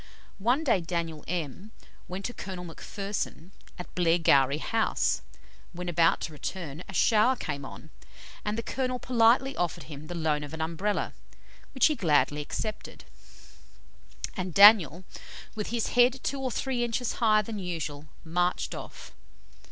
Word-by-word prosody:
One 245 +9 +2
day 235 - +2
Daniel 165 -2 -3
M 175 - -4 0.3
went 185 +2 -6
to 245 - -3
Colonel 185 -5 -7
McPherson, 195 0 -5 0.3
at 180 - -9
Blairgowrie 165 -6 +3
House; 225 +7 0 0.5
when 180 +1 -6
about 165 -1 +3
to - - -4
return, 160 0 -6
a - - -7
shower 225 +7 +4
came 140 - -5
on, 155 +3 -10 0.5
and 210 +1 -2
the 230 - -2
colonel 255 0 -2
politely 250 +2 +3
offered 175 -2 -2
him 150 +1 -10
the 175 - -6
loan 155 -3 0
of 145 +2 -7
an - - -9
Umbrella, 170 +6 -1 0.6
which 265 - +4
he 310 - +4
gladly 150 - +2
accepted, 215 +8 -6 1.3
and 185 -4 -4
Daniel, 195 -5 +8 0.5
with 210 -1 -4
his 235 0 -1
head 245 +2 +4
two 275 - -2
or 260 - -1
three 250 +1 -1
inches 240 +1 -1
higher 215 -2 +4
than 215 0 -5
usual, 160 -5 -5 0.2
marched 175 +2 0
off. - - -9
180 Hz, 145 wpm, -28 LUFS, 160-225 Hz, 1.3 s, Daniel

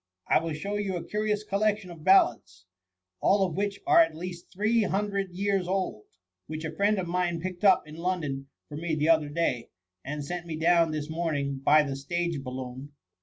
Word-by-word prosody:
I - - +4
will 165 -1 -3
show 200 +7 -3
you 200 -2 -2
a 175 - -4
curious 210 0 -1
collection 210 -2 0
of 165 -3 -11
ballads, 115 - +3 0.5
all 195 -1 +3
of 180 - -4
which 200 +2 -2
are 350 -1 +6
at 330 - +4
least 175 +1 -7
three 215 +5 +2
hundred 200 -1 -1
years 195 0 -1
old, 185 - -2 0.4
which 155 +1 -5
a 155 0 -5
friend 205 +3 +2
of 185 -2 -2
mine 175 -1 0
picked 185 +2 -6
up 195 -3 +6
in 150 +1 -11
London 160 -6 -2 0.2
for 150 - -8
me 165 0 -2
the 155 +1 +1
other 160 -3 +4
day, 145 -7 -1 0.3
and 145 +1 -5
sent 175 +2 -5
me 160 - -4
down 165 +1 +3
this 155 -1 -3
morning 155 -4 -2
by 150 +3 +5
the 140 -2 -3
stage 170 +2 -2
balloon. 130 +2 -7
170 Hz, 195 wpm, -28 LUFS, 150-195 Hz, 0.5 s, are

